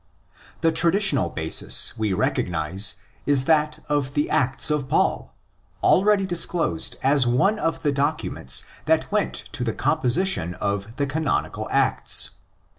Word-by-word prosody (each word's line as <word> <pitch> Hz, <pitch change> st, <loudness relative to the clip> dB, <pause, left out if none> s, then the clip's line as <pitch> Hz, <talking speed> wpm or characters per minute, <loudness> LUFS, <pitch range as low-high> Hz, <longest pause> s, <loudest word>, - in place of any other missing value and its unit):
The 165 Hz, 0 st, +3 dB
traditional 170 Hz, -2 st, +2 dB
basis 80 Hz, 0 st, +1 dB
we 110 Hz, -2 st, -2 dB
recognise 90 Hz, +1 st, +1 dB, 0.3 s
is 140 Hz, -2 st, +4 dB
that 150 Hz, -1 st, +1 dB
of 145 Hz, -2 st, -2 dB
the 145 Hz, -, 0 dB
Acts 130 Hz, +4 st, +1 dB
of 145 Hz, -3 st, -2 dB
Paul, -, -, 0 dB, 0.5 s
already 200 Hz, +1 st, +3 dB
disclosed 170 Hz, -, 0 dB
as 135 Hz, -1 st, +3 dB
one 150 Hz, -, +1 dB
of 165 Hz, -3 st, -2 dB
the 145 Hz, -, +1 dB
documents 140 Hz, -, -1 dB, 0.2 s
that -, -, +1 dB
went -, -, 0 dB, 0.2 s
to -, -, -4 dB
the 115 Hz, -2 st, -3 dB
composition 145 Hz, -, +1 dB
of 100 Hz, +3 st, -4 dB
the 140 Hz, -, -1 dB
canonicalActs. 150 Hz, +2 st, 0 dB
140 Hz, 125 wpm, -23 LUFS, 115-160 Hz, 0.5 s, is